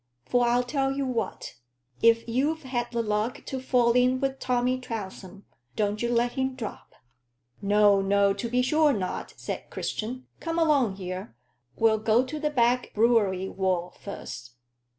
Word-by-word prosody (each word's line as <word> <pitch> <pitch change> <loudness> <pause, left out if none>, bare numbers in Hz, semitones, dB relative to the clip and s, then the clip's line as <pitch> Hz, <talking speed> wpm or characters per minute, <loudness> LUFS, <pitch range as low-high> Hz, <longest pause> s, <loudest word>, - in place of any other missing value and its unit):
For 245 -1 +2
I'll 245 +1 +3
tell 270 +1 0
you 275 0 -2
what 230 -6 -3 0.4
if 230 0 +4
you've 285 +7 0
had 240 -2 -2
the 235 -1 -1
luck 210 +3 -1
to 265 - -4
fall 250 -2 +3
in 250 +1 +3
wi' 275 0 +1
Tommy 255 -1 0
Trounsem, 200 -5 -7 0.3
don't 210 0 -1
you 235 - 0
let 240 0 +2
him 265 0 -2
drop." 230 -5 -8 0.7
"No, 205 0 +4
no 200 0 +3
to 200 +4 -4
be 250 +1 +2
sure 305 +2 +3
not," 190 -5 -4
said - - -6
Christian. 250 +4 -4
"Come 330 0 -3
along 285 - +3
here. 185 - -6 0.4
We'll 220 -1 +3
go 220 +3 +3
to 305 +4 -5
the 300 0 0
Back 245 -3 +2
Brewery 210 -4 +3
wall 185 -2 -1
first." 125 -11 -8
235 Hz, 160 wpm, -27 LUFS, 205-255 Hz, 0.7 s, if